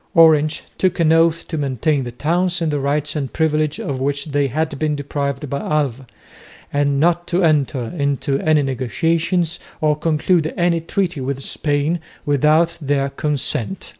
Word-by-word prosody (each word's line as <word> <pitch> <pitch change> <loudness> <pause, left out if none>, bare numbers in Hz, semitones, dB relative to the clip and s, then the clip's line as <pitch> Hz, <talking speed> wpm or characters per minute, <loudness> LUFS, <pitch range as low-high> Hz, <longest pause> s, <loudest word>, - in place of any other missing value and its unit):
Orange 155 -2 +5 0.2
took 185 -2 +1
an 160 -1 +4
oath 165 0 +2
to 160 - -3
maintain 140 +1 0
the 120 - -5
towns 175 +7 0
in 165 -2 0
the 145 - 0
rights 145 +2 -1
and 140 -3 -3
privileges 155 -1 0
of 130 -2 -3
which 140 +1 -1
they 145 -2 0
had 150 +1 -2
been 155 -1 0
deprived 140 0 -3
by 140 +1 -3
Alva 135 -5 -1 0.7
and 145 -1 +1
not 175 +2 +2
to 180 +2 +1
enter 145 -5 +2
into 140 -2 0
any 155 -2 +3
negotiations 160 - 0 0.2
or 155 -2 +2
conclude 155 +1 +1
any 175 -1 +2
treaty 170 -2 -2
with 135 +1 -3
Spain 145 +5 -1 0.3
without 150 +4 +3
their 140 -1 0
consent. 150 - -2
150 Hz, 160 wpm, -19 LUFS, 140-165 Hz, 0.7 s, Orange